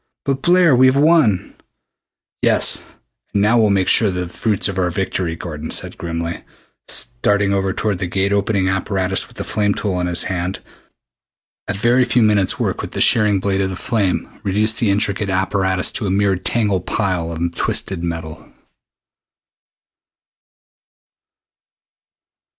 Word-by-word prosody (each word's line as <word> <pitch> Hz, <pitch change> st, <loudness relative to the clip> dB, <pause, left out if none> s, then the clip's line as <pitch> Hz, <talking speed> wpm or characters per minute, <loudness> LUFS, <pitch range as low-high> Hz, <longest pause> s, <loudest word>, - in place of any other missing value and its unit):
But, 135 Hz, -1 st, -1 dB
Blair, 175 Hz, -4 st, +4 dB
we've 130 Hz, +1 st, +4 dB
won!" 145 Hz, -, +3 dB, 0.9 s
"Yes, -, -, +3 dB, 0.5 s
and 100 Hz, -, +2 dB
now 115 Hz, +3 st, +3 dB
we'll 110 Hz, -2 st, +3 dB
make 95 Hz, -2 st, +1 dB
sure 110 Hz, -, +4 dB
of 95 Hz, -, -2 dB
the 90 Hz, 0 st, -3 dB
fruits 105 Hz, +3 st, 0 dB
of 95 Hz, -1 st, -3 dB
our 90 Hz, -1 st, +1 dB
victory," 90 Hz, -1 st, -2 dB
Gordon 80 Hz, -2 st, -7 dB
said -, -, -1 dB
grimly, 85 Hz, -1 st, -5 dB, 0.5 s
starting 100 Hz, +12 st, +1 dB
over 95 Hz, -1 st, 0 dB
toward 100 Hz, -1 st, -2 dB
the 95 Hz, -, -2 dB
Gate 95 Hz, +3 st, 0 dB
opening 100 Hz, -1 st, 0 dB
apparatus 95 Hz, 0 st, -1 dB
with -, -, -20 dB
the -, -, -4 dB
flame 105 Hz, -1 st, -1 dB
tool 95 Hz, -4 st, -2 dB
in 90 Hz, -, -1 dB
his 90 Hz, -1 st, +2 dB
hand. 90 Hz, 0 st, -3 dB, 1.1 s
A -, -, -1 dB
very 120 Hz, +5 st, +3 dB
few 120 Hz, -1 st, +2 dB
minutes' 105 Hz, -3 st, +2 dB
work -, -, -1 dB
with -, -, -8 dB
the -, -, -4 dB
shearing 105 Hz, -3 st, +4 dB
blade 95 Hz, 0 st, -1 dB
of 95 Hz, -1 st, -2 dB
flame 100 Hz, -5 st, -1 dB, 0.2 s
reduced 105 Hz, +3 st, +1 dB
the 115 Hz, -, +2 dB
intricate 100 Hz, 0 st, 0 dB
apparatus 95 Hz, -1 st, 0 dB
to 105 Hz, -, 0 dB
a -, -, -1 dB
mere 100 Hz, 0 st, +1 dB
tangled 100 Hz, -1 st, -1 dB
pile 90 Hz, -6 st, -1 dB
of 85 Hz, +1 st, -3 dB
twisted 90 Hz, 0 st, 0 dB
metal. 80 Hz, -2 st, -6 dB
95 Hz, 150 wpm, -18 LUFS, 90-105 Hz, 1.1 s, Blair